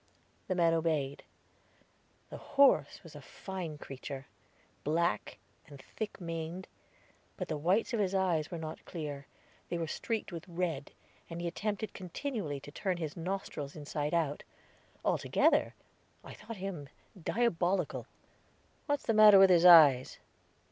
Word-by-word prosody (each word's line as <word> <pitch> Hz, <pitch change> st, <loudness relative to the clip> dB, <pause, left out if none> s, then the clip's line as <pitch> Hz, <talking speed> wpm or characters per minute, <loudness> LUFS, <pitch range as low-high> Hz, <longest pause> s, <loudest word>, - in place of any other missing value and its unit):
The 185 Hz, -, -1 dB
man 170 Hz, -2 st, +3 dB
obeyed. 155 Hz, -4 st, -1 dB, 1.1 s
The -, -, -6 dB
horse 280 Hz, -1 st, +3 dB
was -, -, -13 dB
a -, -, -9 dB
fine 180 Hz, -6 st, -7 dB
creature, 135 Hz, 0 st, -8 dB, 0.6 s
black, 170 Hz, +4 st, 0 dB, 0.3 s
and 145 Hz, -3 st, -12 dB
thick 210 Hz, +10 st, -7 dB
maned; 165 Hz, +1 st, -5 dB, 0.7 s
but 185 Hz, -4 st, -5 dB
the 155 Hz, -, -1 dB
whites 190 Hz, -, +1 dB
of 230 Hz, -, 0 dB
his 195 Hz, -2 st, 0 dB
eyes 175 Hz, -5 st, +1 dB
were 170 Hz, -, -5 dB
not 160 Hz, -1 st, -7 dB
clear; 145 Hz, -5 st, -6 dB, 0.4 s
they 175 Hz, -, -2 dB
were 165 Hz, -, -2 dB
streaked 220 Hz, +7 st, -3 dB
with 170 Hz, +1 st, -8 dB
red, 170 Hz, -5 st, -3 dB, 0.4 s
and 170 Hz, 0 st, -6 dB
he 175 Hz, -, -3 dB
attempted 210 Hz, +4 st, -3 dB
continually 185 Hz, -, -4 dB
to 145 Hz, -, -11 dB
turn 185 Hz, +3 st, -2 dB
his 155 Hz, -4 st, -4 dB
nostrils 170 Hz, -5 st, -5 dB
inside 150 Hz, +1 st, -3 dB
out. 150 Hz, -4 st, 0 dB, 0.6 s
Altogether, -, -, +2 dB, 0.5 s
I -, -, -10 dB
thought 220 Hz, +1 st, -9 dB
him 180 Hz, -7 st, -6 dB, 0.3 s
diabolical. 190 Hz, -3 st, 0 dB, 0.8 s
"What's 290 Hz, -2 st, -1 dB
the 225 Hz, -, +2 dB
matter 215 Hz, -2 st, +9 dB
with 190 Hz, -1 st, +7 dB
his 175 Hz, -1 st, +5 dB
eyes?" 150 Hz, -7 st, +8 dB
170 Hz, 140 wpm, -32 LUFS, 155-190 Hz, 1.1 s, matter